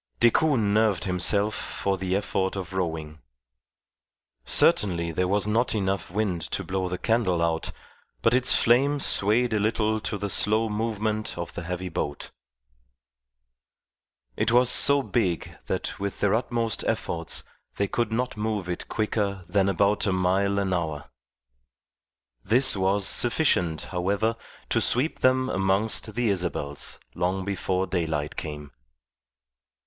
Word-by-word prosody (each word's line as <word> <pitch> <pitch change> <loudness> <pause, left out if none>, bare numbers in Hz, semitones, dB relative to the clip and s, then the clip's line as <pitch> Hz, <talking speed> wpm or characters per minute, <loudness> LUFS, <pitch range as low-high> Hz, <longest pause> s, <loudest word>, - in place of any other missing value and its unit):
Decoud 140 +5 +4
nerved 105 -3 +2
himself 100 +3 +2
for 100 -2 -2
the 95 0 -2
effort 95 -1 -1
of 95 -1 -6
rowing. 80 -4 -3 1.3
Certainly 85 +7 +3
there 90 +3 0
was 100 +2 +1
not 115 +3 +1
enough 95 -2 -1
wind 95 -2 -1
to - - -2
blow 95 -1 -2
the 90 - -3
candle 110 -6 +1
out, 85 -1 -1 0.5
but 115 - +4
its 130 0 +3
flame 140 +5 +3
swayed 115 0 +2
a 105 - +2
little 110 +1 +1
to 105 - -3
the 100 +1 -3
slow 110 +3 +2
movement 110 -1 -2
of 85 -1 -5
the - - -5
heavy 90 +2 -4
boat. 75 -3 -4 2.0
It - - +1
was 125 +1 +4
so 140 +1 +4
big 95 - -1
that - - -3
with 100 0 -4
their 100 -1 +2
utmost 115 -1 0
efforts 85 -1 -1 0.3
they 100 - 0
could 115 +2 -1
not 125 +3 -1
move 105 -3 -2
it 90 -1 -4
quicker 100 -3 -1
than 100 -1 +2
about 100 +2 +2
a - - +2
mile 95 +2 +1
an 95 -2 0
hour. 80 -5 -3 1.3
This 130 +4 +3
was 95 +1 +1
sufficient, 95 - +1
however, 100 +5 0 0.3
to - - +2
sweep 130 +7 +1
them 130 0 +3
amongst 100 +1 0
the 120 -3 +1
Isabels 85 -6 -2
long 90 +2 -1
before 95 -1 -1
daylight 80 -5 -2
came. 75 -2 -6
100 Hz, 135 wpm, -26 LUFS, 90-110 Hz, 2.0 s, Decoud